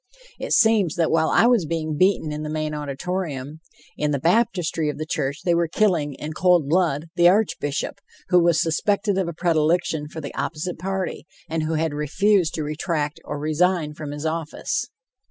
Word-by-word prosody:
It - - -5
seems 220 -8 +4
that 165 -2 +1
while 160 0 +2
I - - +4
was 235 -9 +3
being 160 -1 -2
beaten 180 -2 +2
in 150 0 -4
the 155 - -4
main 155 0 -2
auditorium, 150 0 -4 0.4
in 150 - -1
the 145 - +1
baptistry 170 - +1
of 150 - -4
the 155 - -4
church 145 0 -3
they 175 - +3
were 170 0 +2
killing, 160 -7 +1
in 155 +3 -6
cold 175 -3 +3
blood, 160 -2 +1
the 175 0 +6
Archbishop, 190 -4 -1 0.3
who 180 -1 +5
was 170 -1 +3
suspected 195 +4 +1
of 185 - 0
a 170 - -4
predilection 160 -2 +1
for 160 - -8
the 145 -2 -7
opposite 165 +2 -4
party, 190 -2 -3 0.2
and 160 0 -2
who 160 +1 -1
had 160 -1 0
refused 175 +4 +1
to 155 - -2
retract 150 0 -2
or - - -4
resign 155 +1 +1
from 150 -1 -7
his 145 +1 -6
office. 160 -1 -2
160 Hz, 185 wpm, -23 LUFS, 150-180 Hz, 0.4 s, the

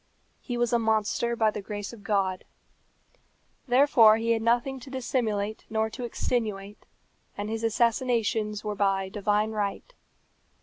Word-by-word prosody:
He 245 - -5
was 240 0 0
a 235 - +4
monster 220 +1 0
by 220 -2 +2
the 210 - -5
grace 205 +2 -6
of 225 - -12
God. 195 -4 0 1.2
Therefore 245 -4 +6
he 230 +1 0
had 225 -1 +1
nothing 240 +4 +1
to 260 - -11
dissimulate 220 -5 -2
nor 220 0 0
to 250 - -7
extenuate, 210 -4 -3 0.5
and 205 +1 -4
his 225 0 -3
assassinations 225 -2 0
were 210 -1 -2
by 195 -1 0
divine 210 +2 0
right. 210 - -3
220 Hz, 140 wpm, -27 LUFS, 205-235 Hz, 1.2 s, Therefore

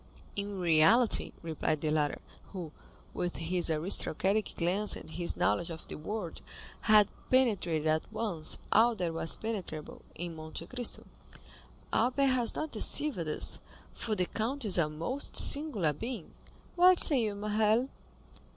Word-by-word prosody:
"In 200 -1 -4
reality," 175 +8 +4
replied 155 -2 -2
the 155 - 0
latter, 150 -1 0 0.4
who, 175 -5 -6 0.4
with 175 -1 -3
his 175 +1 0
aristocratic 190 +5 +2
glance 185 +5 +1
and - - -10
his 175 +1 -1
knowledge 170 - +1
of 160 -1 -8
the - - -6
world, 180 +2 -6 0.5
had 210 -2 +7 0.2
penetrated 200 -12 +1
at 155 0 0
once 175 -9 -2
all 230 +2 +4
that 175 -5 -2
was 165 0 +1
penetrable 190 -9 -6
in 170 -1 -6
Monte 155 0 -8
Cristo, 250 -2 -3 0.9
"Albert 255 +4 +2
has 245 -2 0
not 310 -1 -4
deceived 275 +2 +2
us, 155 -2 0 0.3
for 220 -2 -3
the 180 -2 0
count 240 +7 -3
is 190 -3 +4
a 155 -3 +2
most 170 - -4
singular 250 - +2
being. 225 - -7 0.4
What 365 +1 +6
say 275 -5 +5
you, 210 -2 -2
Morrel!" 215 +4 +1
195 Hz, 140 wpm, -30 LUFS, 165-230 Hz, 0.9 s, had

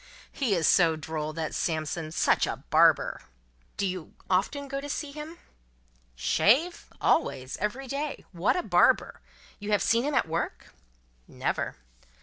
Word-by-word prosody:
He 240 -8 0
is 165 -3 +1
so 165 -3 +5
droll, 155 0 -4
that 160 -1 -4
Samson. 155 0 -2
Such - - +2
a - - -5
Barber!" - - +4 0.6
"Do 200 - 0
you 185 -3 -5 0.2
often 280 +10 0
go 275 0 -4
to 290 - -7
see 290 0 -3
him 305 +3 -8 0.4
" - - -37
"Shave? 270 - +2
Always. 130 - +1
Every 235 +7 -3
day. 285 +3 -4
What 175 +1 +1
a 360 - -1
barber! - - +3 0.4
You 205 0 -6
have 205 - +3
seen 230 0 +3
him 290 0 -1
at 260 - +2
work?" 165 +2 -4 0.5
"Never." - - -2
195 Hz, 150 wpm, -28 LUFS, -, 0.6 s, so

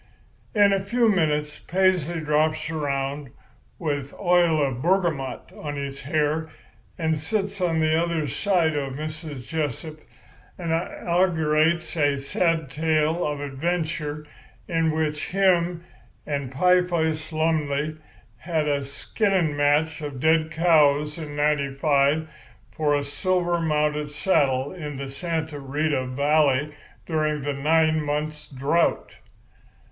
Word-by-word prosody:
"In 205 -1 +5
a 195 0 0
few 235 +3 +2
minutes 150 -6 0
Paisley 175 -3 +1
drops 155 +1 +1
around, 140 -2 -2 0.5
with 145 -4 -3
oil 175 -4 +3
of 130 -2 -3
bergamot 170 -6 0
on 145 -1 -5
his 140 -1 -5
hair, 155 +3 0 0.5
and 160 -1 0
sits 200 +3 -2
on 170 -3 +1
the 155 0 +2
other 165 -1 0
side 165 - +1
of 135 -2 -2
Mrs. 155 -2 -6
Jessup, 155 0 -3 0.6
and 170 -2 -3
inaugurates 165 -1 +1
a 145 -3 +2
sad 160 +1 0
tale 155 +3 +1
of 145 -1 -2
adventure 150 +1 -3 0.4
in 165 -2 +1
which 155 -1 -1
him 180 -3 +2 0.4
and 140 -3 -3
Pieface 165 0 +1
Lumley 155 -2 0 0.4
has 160 +2 -1
a 140 -1 0
skinning 170 +3 0
match 150 +2 +2
of 145 -3 -5
dead 160 +2 +3
cows 150 -2 +3
in 150 -2 -6
'95 145 +1 +1 0.4
for 150 -2 +1
a 145 - 0
silver 175 +4 0
mounted 150 -1 0
saddle 145 -4 +1
in 150 -5 -6
the 135 0 -5
Santa 160 0 -3
Rita 140 -1 -1
valley 145 +1 +2 0.3
during 155 -3 -1
the 145 0 -1
nine 155 +2 +2
months' 150 +1 -3
drought. 140 +5 0
155 Hz, 120 wpm, -24 LUFS, 145-165 Hz, 0.6 s, In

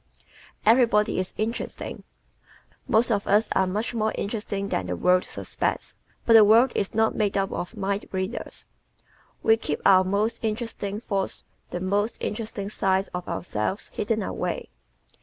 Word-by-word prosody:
Everybody 220 -3 +4
is 185 - -2
Interesting 225 +2 -3
¶ - - -17 0.8
Most 230 +2 +3
of 200 -2 0
us 210 +2 +4
are 190 0 +2
much 210 +6 -2
more 220 -1 0
interesting 200 -1 -3
than 90 - -1
the 90 - -2
world 180 - +3
suspects. - - -3 0.3
But 230 - +5
the 225 -1 +10
world 230 +5 +6
is 200 - -2
not 220 0 +3
made 205 -2 0
up 195 0 0
of 180 +5 -5
mind 200 0 -2
readers. 185 0 -4 0.8
We 225 0 +5
keep - - -3
our 185 -1 +7
most 210 +5 0
interesting 220 -2 -3
thoughts 195 -4 -2 0.3
and 175 +1 -3
the - - -2
most 205 +4 0
interesting 210 -2 -4
side 190 -1 +1
of 180 0 -5
ourselves 140 - -3
hidden 215 0 -1
away. - - -3
205 Hz, 160 wpm, -25 LUFS, 190-220 Hz, 0.8 s, the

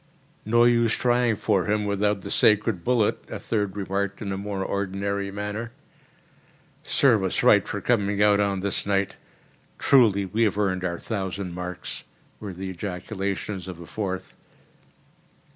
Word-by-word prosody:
"No 120 +2 +5
use 120 -1 +4
trying 120 -2 +2
for 95 -2 +1
him 105 0 0
without 100 0 0
the - - -7
sacred 105 -4 +3
bullet," 120 -4 +1
a - - -4
third 105 -4 -2
remarked 100 0 -2
in 100 -2 -4
a - - -1
more 100 -1 -3
ordinary 100 0 -2
manner. 105 +4 -5 1.1
"Serve 120 -8 +3
us 95 - -1
right - - +5
for - - -4
coming 105 -4 +1
out 105 0 +5
on 100 -2 0
this 100 0 -1
night! 100 -1 0 0.6
Truly 110 -8 +4
we 105 +5 -2
have 105 -3 +2
earned 95 -3 0
our 85 -1 -2
thousand 95 -3 -4
marks!" 90 0 -6 0.4
were 105 -2 -6
the 95 +1 -6
ejaculations 95 +1 -4
of 90 -2 -7
a 85 - -9
fourth. 95 -1 -5
100 Hz, 150 wpm, -25 LUFS, 95-105 Hz, 1.1 s, No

